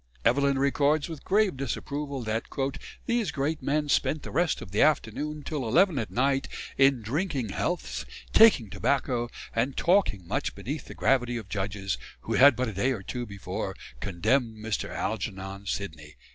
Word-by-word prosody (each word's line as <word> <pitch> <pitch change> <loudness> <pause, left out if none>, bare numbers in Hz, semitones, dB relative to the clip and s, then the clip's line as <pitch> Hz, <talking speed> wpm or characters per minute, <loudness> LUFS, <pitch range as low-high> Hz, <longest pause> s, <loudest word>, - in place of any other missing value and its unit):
Evelyn 140 +3 +3
records 145 +2 +2
with 160 -4 -8
grave 205 -3 +2
disapproval 140 +1 -3
that 110 +1 -2 0.6
"these 235 -5 +1
great 150 +2 -1
men 150 +3 0
spent 150 +1 +1
the - - -7
rest 170 -2 +1
of 90 - -9
the 105 - +2
afternoon 150 0 +1
till 150 -4 -3
11 170 - +4
at 110 - -3
night, 135 +2 +1 0.3
in 135 -3 +4
drinking 135 - -1
healths, - - -2 0.3
taking 170 - +6
tobacco, 125 -2 0 0.3
and 125 +4 0
talking 170 - +2
much - - -2
beneath - - -5
the - - -10
gravity 125 -1 +2
of 110 -4 -8
judges, 100 -1 -2 0.2
who - - -3
had 140 0 +7
but 130 +1 -1
a - - -6
day 125 +8 +1
or 100 -6 -6
two 120 +4 -4
before 100 -2 -5 0.2
condemned 110 - 0
Mr. 110 0 -3
Algernon 100 -2 -4
Sidney." 75 -7 -5
130 Hz, 160 wpm, -28 LUFS, 105-145 Hz, 0.6 s, had